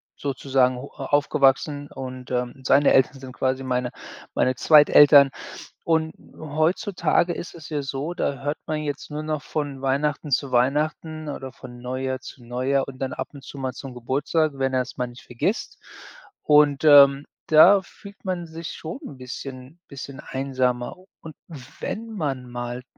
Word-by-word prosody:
sozusagen 130 -2 0
ho 140 +3 -8
aufgewachsen 145 +1 +1
und, 130 -1 -8
ähm, 125 -1 -1
seine 140 +2 +4
Eltern 135 +1 +3
sind 130 -1 -10
quasi 130 +1 -1
meine 125 -1 -1 0.5
meine 130 - +2
Zweiteltern. 145 -1 +7 0.5
Und 160 -1 +1 0.2
heutzutage 170 +3 0
ist 175 - -7
es 160 -2 -11
ja 150 -2 -2
so, 140 +5 -4
da 140 -4 -2
hört 145 +1 -1
man 155 -1 -2
jetzt 145 0 -5
nur 150 +1 -4
noch 155 -2 -3
von 145 -3 -4
Weihnachten 145 +2 -1
zu 135 0 0
Weihnachten 150 +4 0
oder 135 -3 -6
von 120 -2 -12
Neujahr 130 +1 -3
zu 130 - -12
Neujahr 130 +3 -1
und 130 -1 -9
dann 130 -1 -2
ab - - -4
und 135 -1 -12
zu 140 - -10
mal 130 -1 -3
zum 135 -2 -8
Geburtstag, 145 +5 0
wenn 135 -1 -1
er 130 - +2
es 125 - -5
mal 125 -1 -1
nicht 120 +1 -13
vergisst, 155 - -3 0.6
und, 150 -1 +4
ähm, 140 -1 +7 0.2
da 180 +6 +7
fühlt 200 +1 -15
man 180 -2 -3
sich 165 +1 -7
schon 165 +11 -7
'n 135 - -9
bisschen 130 +4 -8
bisschen 140 -1 -8
einsamer 130 0 -2 0.2
und 160 -1 -10 0.5
wenn 230 +2 -4
man 140 - -4
mal 120 +1 -5
140 Hz, 160 wpm, -24 LUFS, 130-155 Hz, 0.6 s, Zweiteltern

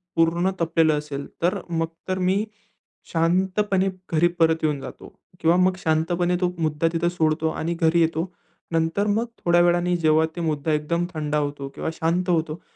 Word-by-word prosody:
पूर्ण 170 +2 +2
तपलेलं 160 -2 +3
असेल 145 -1 -5 0.2
तर, 175 +2 +1
मग 165 -1 0 0.2
तर 185 0 -1
मी 190 +3 +1 0.7
शांतपणे 190 +3 +1 0.2
घरी 165 +1 +4
परत 160 -1 +3
येऊन 150 -2 +1
जातो. - - -9 0.3
किंवा 165 +1 +3
मग 185 0 +3
शांतपणे 175 +2 +1
तो 180 0 +1
मुद्दा 155 0 +1
तिथं 170 +1 +1
सोडतो 160 -2 0
आणि 160 +1 -2
घरी 165 +1 +4
येतो. 165 +2 0 0.4
नंतर 165 +5 +1
मग 215 +3 +1 0.2
थोड्या 175 0 +5
वेळाने 175 0 +2
जेव्हा 160 -1 +3
ते 175 - -4
मुद्दा 155 -1 -1
एकदम 170 +3 0
थंडा 150 -1 -1
होतो 145 -2 -3
किंवा - - -3
शांत 170 +3 -1
होतो, 160 -1 0
165 Hz, 165 wpm, -23 LUFS, 160-175 Hz, 0.7 s, थोड्या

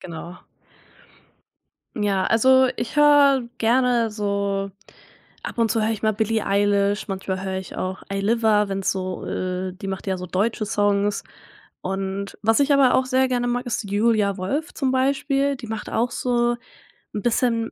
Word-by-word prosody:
Genau. 170 +1 -8 1.6
Ja, 195 -2 +1
also, 260 +3 +5
ich 240 +5 -4
höre 285 -4 +5
gerne 240 -1 +2
so 200 -1 -2 0.7
ab - - -6
und 230 -1 +2
zu 225 - +1
höre 220 +1 +1
ich 220 - -6
mal 215 0 +2
Billie 220 +1 -1
Eilish, 200 +1 +1
manchmal 190 -1 -3
höre 190 0 -3
ich 190 - -9
auch 185 0 -4
Ayliva, 210 +1 +2
wenn's 195 -1 -1
so, 185 -1 -4
äh 185 0 -3
die 195 +1 -9
macht 195 +1 -5
ja 190 -1 -1
so 180 - -6
deutsche 215 +4 -1
Songs. 205 0 0 0.6
Und 195 +1 -4
was 225 +5 +3
ich 285 +1 +3
aber 270 -2 +5
auch 260 - +1
sehr 260 0 +2
gerne 245 -1 0
mag, 245 +1 -1
ist 240 -1 -2
Julia 210 -2 +2
Wolf 280 - -3
zum 265 -3 0
Beispiel, 275 +1 +1
die 235 - -9
macht 220 -1 -5
auch 235 +2 0
so 240 -1 0 0.6
'n 205 - -2
bisschen 230 -1 +1
215 Hz, 165 wpm, -23 LUFS, 195-245 Hz, 1.6 s, also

